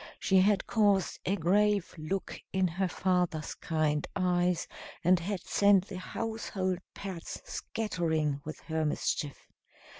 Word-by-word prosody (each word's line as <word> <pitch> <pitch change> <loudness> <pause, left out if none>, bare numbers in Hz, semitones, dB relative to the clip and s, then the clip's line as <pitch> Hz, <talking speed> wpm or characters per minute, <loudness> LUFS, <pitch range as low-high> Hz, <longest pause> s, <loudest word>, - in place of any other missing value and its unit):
She 190 -1 +4
had 195 +1 +3
caused 205 -4 +2
a 195 - +3
grave 200 +2 +2
look 180 +4 -4
in 190 -1 +2
her 185 +3 -1
father's 180 -3 0
kind 155 -2 0
eyes, 180 -2 +1 0.4
and 180 +1 +5
had 185 +1 -3
sent 200 -1 +4
the 185 - -5
household 190 -3 -2 0.2
pets 190 -4 -6
scattering 160 -9 -1
with 155 - -7
her 160 -1 -1
mischief. 150 -1 -1
185 Hz, 125 wpm, -31 LUFS, 165-195 Hz, 0.4 s, and